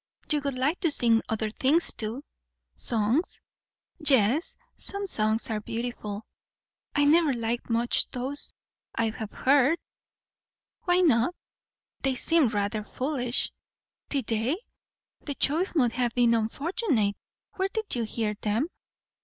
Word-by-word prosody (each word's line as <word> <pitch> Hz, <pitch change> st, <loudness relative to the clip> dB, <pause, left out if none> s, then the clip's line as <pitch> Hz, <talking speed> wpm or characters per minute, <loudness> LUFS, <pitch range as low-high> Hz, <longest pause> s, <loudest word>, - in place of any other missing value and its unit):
"You 300 Hz, -1 st, +2 dB
would 280 Hz, -2 st, -2 dB
like 290 Hz, +7 st, +1 dB
to 345 Hz, -, +2 dB
sing 230 Hz, -5 st, +4 dB
other 220 Hz, -1 st, -1 dB
things, 290 Hz, +9 st, +2 dB
too." 225 Hz, +5 st, -5 dB, 0.5 s
"Songs?" 235 Hz, -, +1 dB, 0.6 s
"Yes. 275 Hz, -, +2 dB, 0.2 s
Some 400 Hz, 0 st, -4 dB
songs 220 Hz, -, +1 dB
are 215 Hz, -1 st, -1 dB
beautiful." 225 Hz, -2 st, -5 dB, 0.7 s
"I 290 Hz, -, +4 dB
never 310 Hz, -1 st, +5 dB
liked 235 Hz, 0 st, -2 dB
much 235 Hz, +1 st, +2 dB
those 265 Hz, +3 st, +1 dB, 0.4 s
I 230 Hz, -1 st, +1 dB
have 215 Hz, -1 st, -6 dB
heard." 280 Hz, +4 st, +3 dB, 1.1 s
"Why 355 Hz, 0 st, +4 dB
not?" 270 Hz, -1 st, +3 dB, 0.7 s
"They 270 Hz, -1 st, +1 dB
seemed 305 Hz, -1 st, +3 dB
rather 205 Hz, 0 st, -1 dB
foolish." 250 Hz, 0 st, -1 dB, 0.6 s
"Did 275 Hz, -5 st, -1 dB
they! 225 Hz, +8 st, 0 dB, 0.7 s
The 285 Hz, -, -4 dB
choice 335 Hz, +8 st, +1 dB
must 245 Hz, -7 st, +3 dB
have 245 Hz, -2 st, -1 dB
been 240 Hz, -1 st, +4 dB
unfortunate. 230 Hz, -, 0 dB, 0.4 s
Where 380 Hz, 0 st, +1 dB
did 440 Hz, 0 st, -2 dB
you 240 Hz, -, -1 dB
hear 220 Hz, -1 st, -1 dB
them?" 225 Hz, +10 st, 0 dB
250 Hz, 130 wpm, -27 LUFS, 225-300 Hz, 1.1 s, never